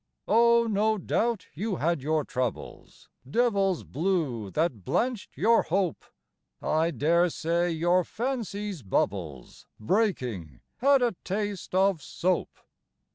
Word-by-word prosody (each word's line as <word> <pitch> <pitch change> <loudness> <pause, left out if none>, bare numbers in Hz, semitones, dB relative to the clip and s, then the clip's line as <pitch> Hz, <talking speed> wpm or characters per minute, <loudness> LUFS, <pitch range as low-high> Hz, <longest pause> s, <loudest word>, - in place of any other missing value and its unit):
Oh, 235 +1 +5
no 215 0 +1
doubt 225 +2 -1
you 195 +6 -2
had 165 -2 0
your 155 +1 0
troubles, 125 -3 -5 0.2
Devils 195 - +1
blue 145 - -1
that 145 - -1
blanched 240 - -2
your 230 +2 +4
hope. 180 -2 -1 0.5
I 160 +2 +1
dare 170 +2 +2
say 170 +2 0
your 175 +2 +2
fancy's 210 - -4
bubbles, 95 - -3
Breaking, 115 - -1 0.2
had 275 0 +4
a 235 -5 +1
taste 200 -1 -3
of 190 -3 +3
soap. 180 +5 -1
180 Hz, 115 wpm, -27 LUFS, 150-215 Hz, 0.5 s, Oh